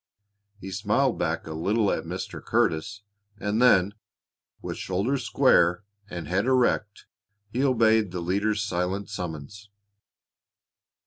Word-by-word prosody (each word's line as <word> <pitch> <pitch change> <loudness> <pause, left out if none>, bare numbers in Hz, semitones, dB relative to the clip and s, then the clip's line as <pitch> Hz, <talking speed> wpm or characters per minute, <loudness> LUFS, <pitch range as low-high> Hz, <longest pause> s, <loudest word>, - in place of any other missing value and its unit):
He 95 0 -8
smiled 105 +7 +1
back 80 -1 -1
a 80 - -6
little 100 +6 +1
at - - -2
Mr. - - -6
Curtis, 95 +6 0 0.3
and 105 +3 -1
then, 100 -5 +5 0.7
with - - -6
shoulders 115 +9 -1
square 90 -3 +3 0.3
and 85 -5 -6
head 95 +7 0
erect, 120 -5 +1 0.5
he 125 +4 -1
obeyed 110 -5 +3
the 90 0 -5
leader's 100 +4 0
silent 95 0 -2
summons. 90 +2 -7
100 Hz, 120 wpm, -26 LUFS, 90-110 Hz, 0.7 s, then